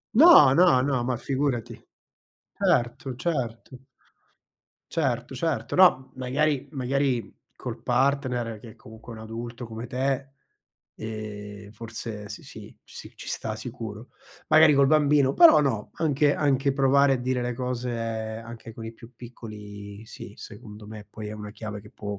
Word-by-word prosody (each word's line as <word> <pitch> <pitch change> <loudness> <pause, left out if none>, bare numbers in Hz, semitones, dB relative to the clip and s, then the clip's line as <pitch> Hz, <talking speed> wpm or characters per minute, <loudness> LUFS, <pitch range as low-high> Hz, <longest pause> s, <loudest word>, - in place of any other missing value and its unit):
No, 260 - +9
no, 165 -5 +5
no, 130 -2 0
ma 125 0 -1
figurati. 130 -3 -1 0.8
Certo, 120 +2 0
certo. 130 -4 -4 1.1
Certo, 130 -5 -1
certo. 160 +3 -2
No, 180 -8 +5
m - - -19
magari 140 +1 0
magari 135 -3 -1 0.2
col - - -7
partner, 125 -3 0
che 110 0 -12
comunque 110 +2 -13
è 110 - -9
un - - -9
adulto 115 +2 -7
come 115 +1 -7
te, 135 +2 -1 0.7
ehm, 105 -2 -7
forse, 110 -1 -6
sì, 105 - -8
sì, - - -11
sì, - - -10
ci - - -10
sta 110 -1 -3
sicuro, 115 -1 -7 0.4
magari 155 -2 +7
col 140 0 +5
bambino 145 -2 +4
però 330 - +8
no, 110 -7 -1
anche 145 -2 +2
anche 140 -2 +1
provare 140 0 +4
a - - +1
dire 125 0 -1
le 120 0 -2
cose 125 0 -3
anche 115 0 -5
con 115 - -8
i 110 - -6
più 115 +1 -15
piccoli, 105 -3 -10
sì, - - -10
secondo 105 0 -11
me 105 -1 -10
poi 105 0 -8
è - - -6
una 105 -1 -8
chiave 105 -1 -7
che 105 - -15
può 105 -1 -6
120 Hz, 150 wpm, -26 LUFS, 110-135 Hz, 1.1 s, No